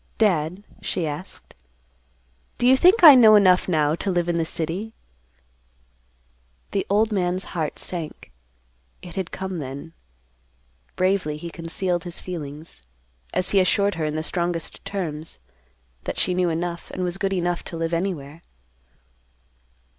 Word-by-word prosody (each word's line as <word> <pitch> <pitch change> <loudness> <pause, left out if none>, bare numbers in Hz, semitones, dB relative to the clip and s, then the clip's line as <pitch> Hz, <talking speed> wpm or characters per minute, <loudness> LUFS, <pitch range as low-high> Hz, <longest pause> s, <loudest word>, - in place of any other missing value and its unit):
"Dad," 180 -3 +1 0.2
she 175 - -2
asked, 155 +5 -7 1.0
"Do - - 0
you 260 - +7
think 360 +8 +5
I 305 -4 +13
know 225 -4 +8
enough 185 -3 +5
now 155 -4 +2
to 185 +4 -2
live 175 -2 0
in 170 -1 0
the 165 - +1
city?" 175 +8 -4 1.8
The 195 - -1
old 215 +3 +2
man's 185 -2 0
heart 160 -4 -2
sank. 170 -4 -6 0.7
It 175 - -10
had 190 -3 -3
come 190 -2 -5
then. 140 +4 -7 1.0
Bravely 185 -5 +1
he 170 +2 -7
concealed 175 +1 -2
his 175 -1 -4
feelings, 155 - -8 0.5
as 180 - -1
he 200 - +4
assured 200 +2 +2
her 165 -3 -2
in 150 0 -2
the 155 - -2
strongest 170 -1 -3
terms, 165 -5 -5 0.7
that - - -4
she 180 - +2
knew 180 -1 +1
enough, 170 +1 -3
and 185 - -4
was 180 +1 -3
good 195 -1 0
enough 175 -1 -1
to 165 - -6
live 165 +1 -2
anywhere. 165 -4 -3
175 Hz, 145 wpm, -23 LUFS, 165-190 Hz, 1.8 s, I